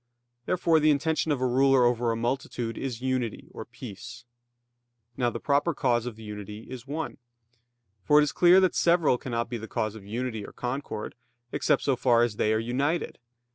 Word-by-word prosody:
Therefore 165 Hz, -3 st, +3 dB
the 155 Hz, 0 st, +3 dB
intention 155 Hz, +2 st, +1 dB
of 145 Hz, -, 0 dB
a -, -, +2 dB
ruler 130 Hz, 0 st, +4 dB
over 120 Hz, -1 st, +1 dB
a -, -, -1 dB
multitude 120 Hz, -1 st, -2 dB
is 125 Hz, -3 st, -5 dB
unity, 130 Hz, -4 st, -2 dB
or -, -, -8 dB
peace. 115 Hz, +1 st, -10 dB, 0.9 s
Now 120 Hz, -1 st, +1 dB
the 115 Hz, -, -5 dB
proper 145 Hz, +5 st, +1 dB
cause 120 Hz, -3 st, +1 dB
of 115 Hz, -3 st, -6 dB
unity 105 Hz, 0 st, -8 dB
is 130 Hz, 0 st, -9 dB
one. 150 Hz, +2 st, -4 dB, 0.9 s
For 150 Hz, -, +4 dB
it -, -, +5 dB
is 150 Hz, -, -1 dB
clear 180 Hz, +1 st, +6 dB
that 185 Hz, -, +3 dB
several 170 Hz, -7 st, +3 dB
cannot 120 Hz, -2 st, -3 dB
be 120 Hz, 0 st, -5 dB
the 110 Hz, -, -8 dB
cause 110 Hz, -1 st, -2 dB
of 110 Hz, -3 st, -11 dB
unity 110 Hz, +1 st, -4 dB
or -, -, -10 dB
concord, 125 Hz, -4 st, -4 dB, 0.4 s
except -, -, +1 dB
so 135 Hz, -, +2 dB
far 120 Hz, -1 st, +3 dB
as 115 Hz, -3 st, -1 dB
they 105 Hz, -, +2 dB
are 110 Hz, -, +2 dB
united. 135 Hz, +9 st, -1 dB
125 Hz, 185 wpm, -27 LUFS, 115-140 Hz, 0.9 s, clear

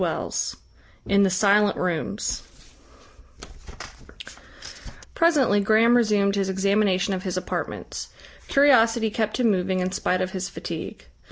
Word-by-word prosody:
CHAPTER -, -, -2 dB, 0.8 s
VII -, -, -3 dB
IN 200 Hz, -, +5 dB
THE 195 Hz, -, +4 dB
SILENT 200 Hz, +2 st, +2 dB
ROOMS 180 Hz, +3 st, -3 dB, 2.7 s
Presently 290 Hz, -11 st, +3 dB
Graham 220 Hz, +4 st, +3 dB
resumed 210 Hz, -4 st, +2 dB
his 195 Hz, -1 st, -1 dB
examination 195 Hz, 0 st, +1 dB
of 185 Hz, -, -3 dB
his 185 Hz, -1 st, -4 dB
apartments. 185 Hz, -, -5 dB, 0.4 s
Curiosity 235 Hz, -5 st, +3 dB
kept 215 Hz, +2 st, -2 dB
him 235 Hz, -3 st, +3 dB
moving 185 Hz, -1 st, -1 dB
in 185 Hz, 0 st, -2 dB
spite 185 Hz, -1 st, -1 dB
of 185 Hz, 0 st, -2 dB
his 185 Hz, -1 st, -4 dB
fatigue. -, -, -7 dB
200 Hz, 120 wpm, -23 LUFS, 185-220 Hz, 2.7 s, IN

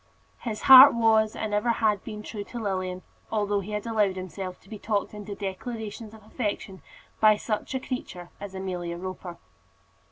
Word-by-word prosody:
His 220 Hz, -3 st, -5 dB
heart 265 Hz, +1 st, +10 dB
was 220 Hz, -2 st, +3 dB
and 215 Hz, -1 st, -3 dB
ever 210 Hz, +3 st, +1 dB
had 215 Hz, -3 st, +1 dB
been 215 Hz, -2 st, -7 dB
true 210 Hz, -2 st, -6 dB
to 245 Hz, -, -9 dB
Lilian, 185 Hz, -3 st, -3 dB, 0.3 s
although 205 Hz, -2 st, 0 dB
he 205 Hz, +2 st, -7 dB
had 210 Hz, +1 st, -3 dB
allowed 210 Hz, -4 st, +1 dB
himself 185 Hz, 0 st, -6 dB
to -, -, -23 dB
be 215 Hz, 0 st, -9 dB
talked 210 Hz, -1 st, -2 dB
into 205 Hz, -1 st, -7 dB
declarations 215 Hz, +2 st, -6 dB
of 215 Hz, -, -16 dB
affection 205 Hz, -4 st, -4 dB, 0.4 s
by 215 Hz, -1 st, +6 dB
such 215 Hz, +4 st, -3 dB
a -, -, 0 dB
creature 185 Hz, -10 st, -6 dB
as 200 Hz, -1 st, -8 dB
Amelia 180 Hz, -2 st, -4 dB
Roper. 185 Hz, -1 st, -7 dB
210 Hz, 170 wpm, -26 LUFS, 190-220 Hz, 0.4 s, heart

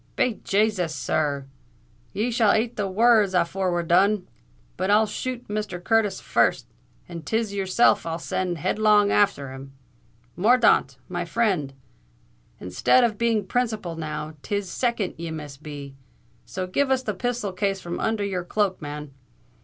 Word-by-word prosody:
"Be 245 Hz, -4 st, 0 dB
Jasus; 195 Hz, -6 st, +1 dB
sir 140 Hz, 0 st, -1 dB
r—ye 120 Hz, -, -7 dB
shall 225 Hz, -3 st, +3 dB
ate 225 Hz, +2 st, 0 dB
the 205 Hz, -2 st, -1 dB
wor 225 Hz, +4 st, +5 dB
rds 190 Hz, -3 st, +1 dB
afore 185 Hz, +2 st, -1 dB
we're 175 Hz, 0 st, 0 dB
done. 185 Hz, +3 st, +3 dB, 0.5 s
But 185 Hz, +2 st, -2 dB
I'll 210 Hz, +2 st, +5 dB
shoot 250 Hz, +3 st, -5 dB
Mr. 210 Hz, -3 st, -3 dB
Curtis 215 Hz, -3 st, +2 dB
first; -, -, +1 dB, 0.4 s
and 170 Hz, -2 st, -8 dB
'tis 220 Hz, +6 st, -1 dB
yourself 195 Hz, +4 st, +3 dB
I'll 165 Hz, 0 st, -3 dB
send 175 Hz, +1 st, -2 dB
headlong 210 Hz, +4 st, +3 dB
afther 195 Hz, -10 st, +2 dB
him. 135 Hz, +1 st, -10 dB, 0.6 s
Morthaunt, 215 Hz, -, +3 dB
my 175 Hz, -1 st, -3 dB
frind, 175 Hz, -8 st, 0 dB, 0.8 s
instead 90 Hz, -, +3 dB
of 220 Hz, -3 st, 0 dB
being 225 Hz, -3 st, +1 dB
principal 220 Hz, -6 st, -2 dB
now, 155 Hz, -1 st, -5 dB
'tis 200 Hz, 0 st, -3 dB
second 235 Hz, -6 st, -1 dB
ye 170 Hz, 0 st, -4 dB
must 150 Hz, -3 st, -8 dB
be. 145 Hz, -2 st, -8 dB, 0.5 s
So 185 Hz, -1 st, -4 dB
give 265 Hz, +10 st, 0 dB
us 260 Hz, -1 st, +1 dB
the 215 Hz, -, -2 dB
pisthol 235 Hz, -1 st, -2 dB
case 195 Hz, 0 st, 0 dB
from 175 Hz, -1 st, -5 dB
under 220 Hz, -2 st, 0 dB
your 185 Hz, -3 st, -2 dB
cloak, 195 Hz, 0 st, -1 dB
man." 150 Hz, -1 st, -6 dB
190 Hz, 155 wpm, -24 LUFS, 160-215 Hz, 0.8 s, wor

